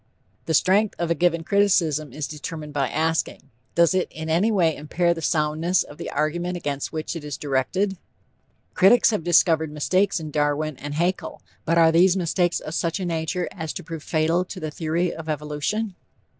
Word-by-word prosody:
The 160 - +2
strength 200 +6 +3
of 170 -1 -1
a - - +5
given 170 0 +1
criticism 165 -7 +2
is 145 +2 -4
determined 150 0 -7
by 135 -3 0
asking: 160 +1 -1 0.2
Does 170 +1 +4
it 185 -1 +1
in 160 0 -5
any 180 +7 +3
way 170 -6 +2
impair 170 +4 0
the 165 - -7
soundness 155 +3 +1
of 145 - -14
the - - -5
argument 175 +4 -1
against 145 -4 -3
which 160 +1 -4
it 165 - -6
is 145 -3 -5
directed? 180 +8 -1 0.8
Critics 230 +5 +5
have 210 -7 -1
discovered 160 -2 +3
mistakes 185 +6 +1
in 155 -2 -7
Darwin 150 0 0
and 145 +1 -6
Haeckel, 175 +4 -2 0.2
but 165 +1 +2
are 165 -1 +6
these 180 +3 +4
mistakes 175 0 +1
of 155 - -7
such 170 +3 -1
a 185 - -3
nature 170 +1 -2
as 160 -4 -5
to 180 - -6
prove 165 -1 -7
fatal 165 +3 +1
to 185 +1 -8
the 155 -2 -4
theory 165 +3 -1
of 160 -1 -8
evolution? 150 +8 -2
165 Hz, 185 wpm, -23 LUFS, 155-180 Hz, 0.8 s, are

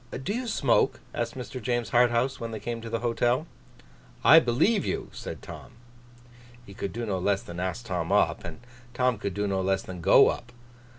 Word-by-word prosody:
'Do 175 +12 -4
you 245 +2 -3
smoke?' 140 - +2
asked - - -3
Mr. 130 0 -7
James 120 +1 -1
Harthouse, 120 +2 +2
when 115 - -4
they 110 -1 -6
came 115 +2 -5
to 115 - -7
the 115 0 -2
hotel. 120 +4 +1 0.8
'I 160 - +9
believe 165 - +2
you!' - - -3
said - - -8
Tom. - - -10 0.9
He 100 - -12
could 100 -1 -4
do 120 +3 -4
no 95 -4 -2
less 100 +2 0
than 85 0 -8
ask 95 +6 -3
Tom 90 -6 -3
up; - - +2
and - - -8 0.3
Tom 125 -3 +1
could 100 -2 -4
do 100 0 -1
no 95 -1 0
less 95 0 0
than 90 -2 -8
go - - +6
up. 120 0 -5
115 Hz, 195 wpm, -27 LUFS, 100-125 Hz, 0.9 s, I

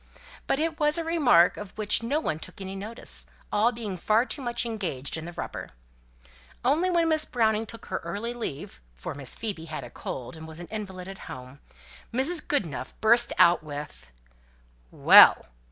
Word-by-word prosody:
But - - +2
it 320 +1 -1
was 300 0 +2
a 335 - -1
remark 275 - +4
of 205 -1 -9
which 215 +1 +1
no 270 +7 0
one 155 - -2
took - - -10
any 190 0 -6
notice, 215 +4 -5 0.2
all 220 +3 +3
being 220 -6 -5
far 215 +7 +2
too 285 - -4
much 240 -1 -2
engaged 180 - -3
in 160 0 -5
the 175 - -6
rubber. - - -6 1.0
Only 315 +8 +3
when 340 -2 +2
Miss 310 -1 +2
Browning 220 -2 +1
took 230 - -10
her 185 - -3
early 205 +8 -4
leave 140 - -6
(for 65 - -6
Miss 140 -2 -6
Phoebe 200 -8 -4
had 155 -4 -6
a 120 - -10
cold, 125 +6 -6
and 160 0 -10
was 160 +1 -11
an 175 - -7
invalid 190 -4 -6
at 195 0 -9
home), 130 +2 -9 0.5
Mrs. 285 +8 0
Goodenough 175 - -2
burst 235 +2 +4
out 170 0 +6
with 145 - -8 0.8
"Well! - - +8
210 Hz, 180 wpm, -27 LUFS, 165-245 Hz, 1.0 s, Well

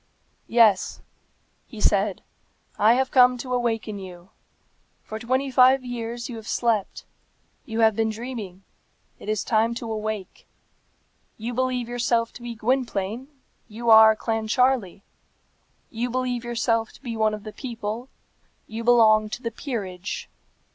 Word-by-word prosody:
"Yes," 225 -5 +3 0.7
he 225 - -10
said; 200 -1 +1 0.6
"I 215 +3 +6
have 260 +1 0
come 250 -1 +6
to 250 +1 -5
awaken 225 -4 -1
you. 180 -1 -11 0.7
For 220 - -7
twenty 260 +3 -1
five 255 +1 +5
years 235 0 -5
you 240 -4 -7
have 220 0 -10
slept. 225 -4 -1 0.6
You 225 0 -2
have 220 -2 +5
been 225 0 +1
dreaming. 220 -5 -7 0.6
It - - -8
is 215 -2 0
time 230 +1 +1
to 230 -1 -5
awake. 215 -2 -5 0.9
You 230 +3 -4
believe 250 -1 -1
yourself 235 -1 0
to - - -12
be 240 -1 -6
Gwynplaine; 235 -1 -1 0.4
you 230 +1 -1
are 220 0 +8
Clancharlie. 225 -2 0 0.9
You 240 +1 -2
believe 250 -1 -2
yourself 230 -1 0
to - - -17
be 235 -3 -4
one 215 -1 +1
of 210 - -11
the 215 - -8
people; 235 -1 -5 0.6
you 225 +1 -6
belong 220 -3 +5
to 245 - -6
the 230 - -2
peerage. 210 -7 -5
230 Hz, 140 wpm, -24 LUFS, 215-245 Hz, 0.9 s, are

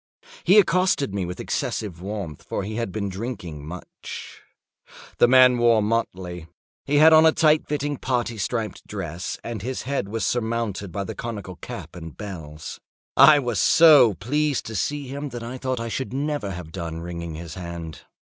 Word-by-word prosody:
He 195 - +5
accosted 185 - +3
me 95 -3 -2
with 90 - -6
excessive 90 -6 -3
warmth, 95 -6 -5
for - - -4
he 110 +3 -5
had 115 -5 -2
been 100 +1 -3
drinking 95 - -6
much. 90 +2 -9 0.8
The - - +7
man 125 -1 +6
wore 115 -2 +4
motley. 95 -6 -2 0.4
He 145 - 0
had 155 +2 +7
on 160 0 +8
a - - +6
tight 155 -1 +3
fitting 145 -1 -2
parti 120 -4 -2
striped 110 +2 -3
dress, 85 +4 -5
and 115 -4 -5
his 130 +4 -4
head 135 -7 -2
was 110 -1 -2
surmounted 115 -5 -2
by 100 +4 -3
the 95 - -5
conical 105 -6 -6
cap - - -8
and 80 -3 -9
bells. 80 -7 -8 0.4
I 140 +2 +8
was 120 -7 -1
so 145 - +7
pleased 145 - -1
to 110 - -6
see 145 - -2
him, 140 +2 -5
that 120 -2 -7
I 125 +2 -6
thought 130 -1 -2
I 115 - -3
should 115 0 -4
never 145 -5 -2
have 90 -4 -7
done 85 -2 -5
wringing 85 -1 -6
his 80 0 -7
hand. 85 -3 -7
110 Hz, 175 wpm, -24 LUFS, 90-130 Hz, 0.8 s, on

